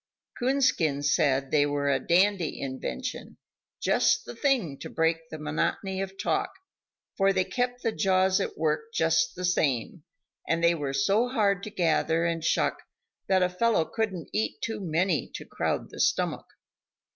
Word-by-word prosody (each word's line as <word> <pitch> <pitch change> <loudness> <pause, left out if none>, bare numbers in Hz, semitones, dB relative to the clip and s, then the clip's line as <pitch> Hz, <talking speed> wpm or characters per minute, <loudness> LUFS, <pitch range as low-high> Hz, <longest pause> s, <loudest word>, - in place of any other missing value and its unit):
Coonskin 245 - +1
said 140 -3 +2
they 145 -1 +4
were 145 -1 0
a 135 - +2
dandy 180 +3 +2
invention, 140 - -5 0.4
just - - +2
the - - -8
thing 235 - 0
to - - -7
break 165 0 0
the 155 - -7
monotony 155 +5 -2
of 195 0 -6
talk, - - 0 0.7
for 195 0 +3
they 190 -1 +2
kept 245 +4 -2
the 225 - +1
jaws 190 -2 +2
at - - -4
work 150 -1 -1
just 160 0 +2
the 180 - -3
same; 150 -2 0 0.5
and 165 +1 +1
they 170 0 +5
were 145 -4 -3
so 195 - +2
hard 205 -6 +1
to 215 - -6
gather 165 -3 +1
and 165 -1 -1
shuck - - +1 0.5
that 190 -1 +3
a - - +4
fellow 180 -2 +1
couldn't 195 -6 -3
eat 220 - -1
too 225 -2 -3
many 170 -1 0
to - - -7
crowd - - -2
the - - -10
stomach. - - 0
170 Hz, 160 wpm, -27 LUFS, 155-200 Hz, 0.7 s, they